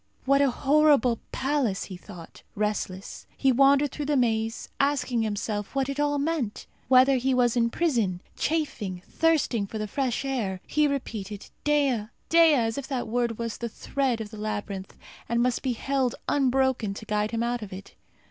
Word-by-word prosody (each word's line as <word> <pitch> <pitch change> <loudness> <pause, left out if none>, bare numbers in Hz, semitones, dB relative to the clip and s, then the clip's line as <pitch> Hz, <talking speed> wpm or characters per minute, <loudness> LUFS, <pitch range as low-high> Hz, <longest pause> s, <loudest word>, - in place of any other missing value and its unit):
What 275 +1 +4
a 280 - +4
horrible 275 -3 +3
palace! 260 -7 0
he 190 - -8
thought. 180 -2 -12
Restless, 200 -2 -3
he 270 - +3
wandered 275 +2 +4
through 295 -2 -4
the 295 -1 +2
maze, 225 -2 0
asking 275 -4 +1
himself 210 0 -3
what 270 0 0
it 275 +1 -3
all 290 0 +1
meant 285 -7 -2 0.2
whether 260 +2 +6
he 260 +1 +1
was 245 -1 +3
in 235 -1 +2
prison; 230 - 0 0.2
chafing, 215 - -2
thirsting 295 -10 +1
for 220 - -6
the 215 0 -3
fresh 260 +3 -1
air. 220 -9 -2
He 300 0 +2
repeated 215 -7 -5
Dea! 280 -7 +2 0.2
Dea! 330 -2 +6
as 225 -1 0
if 270 - -7
that 260 -4 -2
word 235 0 -1
was 230 -1 -4
the 235 - -3
thread 260 +1 -1
of 210 -1 -7
the 215 - -9
labyrinth, 205 -2 -5 0.3
and 235 +1 +1
must 250 -1 0
be 260 -2 0
held 265 +1 -1
unbroken, 265 -6 +1
to 220 - -8
guide 210 0 0
him 230 0 -1
out 240 0 -1
of 210 - -7
it. 190 +1 -9
245 Hz, 175 wpm, -26 LUFS, 215-275 Hz, 0.3 s, whether